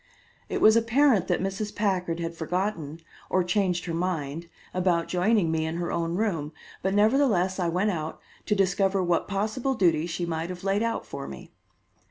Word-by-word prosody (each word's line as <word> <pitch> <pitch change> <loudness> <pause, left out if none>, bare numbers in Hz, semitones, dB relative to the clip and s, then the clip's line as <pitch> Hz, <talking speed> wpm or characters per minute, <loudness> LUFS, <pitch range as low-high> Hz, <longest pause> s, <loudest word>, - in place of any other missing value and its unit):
It - - -2
was 215 +1 +7
apparent 230 -2 +3
that 180 0 0
Mrs. 195 +2 -3
Packard 180 -5 0
had 165 0 -3
forgotten 165 -2 -3 0.3
or 185 - +2
changed 180 -2 0
her 170 - -3
mind 165 -2 -2 0.3
about 180 -2 +1
joining 185 -1 +2
me 160 -1 0
in 160 +1 -2
her 170 0 -2
own 170 0 -1
room, 170 -8 -1 0.3
but 190 +1 0
nevertheless 210 -5 +3
I 175 -2 +1
went 185 +5 +1
out, 160 -3 -4 0.3
to 210 - +2
discover 195 0 +2
what 175 -1 +1
possible 220 +7 -1
duties 170 -5 +2
she 175 +1 -2
might 165 0 -3
have 180 0 -7
laid 195 +1 +1
out 230 0 -1
for - - -7
me. - - -10
180 Hz, 180 wpm, -26 LUFS, 170-205 Hz, 0.3 s, was